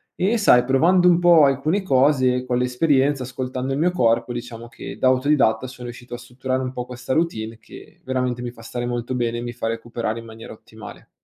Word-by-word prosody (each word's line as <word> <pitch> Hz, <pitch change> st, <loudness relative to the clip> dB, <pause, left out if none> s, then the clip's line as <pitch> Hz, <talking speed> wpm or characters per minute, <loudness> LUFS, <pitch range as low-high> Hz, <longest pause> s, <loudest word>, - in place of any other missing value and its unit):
e, 205 Hz, +6 st, +1 dB
sai, 160 Hz, -, +5 dB
provando 170 Hz, +8 st, +4 dB
un 175 Hz, -1 st, +4 dB
po' 175 Hz, -3 st, +6 dB
alcune 145 Hz, +8 st, +1 dB
cose 130 Hz, -4 st, +2 dB
con 125 Hz, -1 st, -1 dB
l'esperienza, 135 Hz, +2 st, +1 dB
ascoltando 130 Hz, +1 st, -4 dB
il 135 Hz, -, -2 dB
mio 175 Hz, +3 st, +2 dB
corpo, 120 Hz, -7 st, +1 dB
diciamo 120 Hz, -1 st, -7 dB
che 100 Hz, -3 st, -9 dB
da 130 Hz, -, +2 dB
autodidatta 130 Hz, -3 st, +2 dB
sono 125 Hz, -1 st, -10 dB
riuscito 120 Hz, 0 st, -10 dB
a -, -, -4 dB
strutturare 130 Hz, +2 st, -4 dB
un 130 Hz, -1 st, -3 dB
po' 125 Hz, -1 st, -5 dB
questa 125 Hz, 0 st, -7 dB
routine 115 Hz, -9 st, -2 dB
che -, -, -15 dB
veramente 125 Hz, -2 st, -2 dB
mi 120 Hz, -1 st, -5 dB
fa 115 Hz, -, -16 dB
stare 120 Hz, +1 st, -5 dB
molto 120 Hz, +1 st, -3 dB
bene 120 Hz, -1 st, -1 dB
e -, -, -5 dB
mi 120 Hz, 0 st, -5 dB
fa 120 Hz, -1 st, -4 dB
recuperare 115 Hz, 0 st, -4 dB
in 115 Hz, -, -11 dB
maniera 115 Hz, 0 st, -11 dB
ottimale. 110 Hz, -1 st, -13 dB
125 Hz, 210 wpm, -22 LUFS, 120-135 Hz, -, po